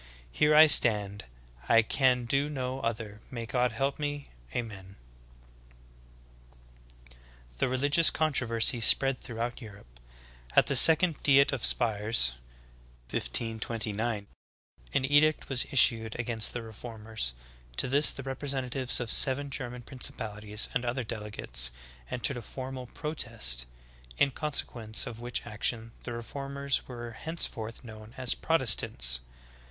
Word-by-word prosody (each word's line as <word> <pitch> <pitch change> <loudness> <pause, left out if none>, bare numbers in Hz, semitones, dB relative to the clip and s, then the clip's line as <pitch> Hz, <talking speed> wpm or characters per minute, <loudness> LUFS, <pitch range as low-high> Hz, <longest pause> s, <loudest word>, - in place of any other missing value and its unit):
Here 150 - +2
I 155 +1 +9
stand, 105 - +3 0.4
I 115 0 +5
can 125 +1 +1
do 140 +4 -1
no 130 -2 -4
other, 110 -3 -5
may 120 -3 -6
God 125 +1 -1
help 135 +6 -3
me! 145 -1 -5 0.2
Ameri!" 100 - -7 2.1
8. - - -23 0.5
The - - 0
religious 145 +5 +4
controversy 125 -6 +1
spread 135 +3 +5
throughout 120 +1 -6
Europe. 100 - -14 0.6
At - - +5
the 140 - 0
Second 160 +4 +7
Diet 140 0 +4
of 130 - -4
Spires 105 - +2 0.8
(1529) 110 - -1 0.7
an 135 - 0
edict 145 +2 +2
was 135 0 +2
issued 115 -4 +1
against 115 -2 0
the 120 - -5
reformers; 110 - -6 0.4
to - - +2
this 140 +4 +4
the 135 - -8
representatives 135 -1 -2
of 120 -2 -4
seven 140 +1 +2
German 125 -2 -6
principalities 105 -4 -2
and 125 - -1
other 125 +1 -3
delegates 105 - 0 0.4
entered 125 +2 -3
a - - -6
formal 130 +1 -8
protest, 115 - -3 0.5
in 140 - +2
consequence 120 -6 -2
of 115 -2 -8
which 120 0 -5
action 110 +2 -4
the 120 - -5
reformers 140 +3 -4
were 120 -2 -8
henceforth 115 -5 -2
known 110 -1 -13
as 130 -2 +1
Protestants. 105 - +2
120 Hz, 125 wpm, -28 LUFS, 110-135 Hz, 2.1 s, I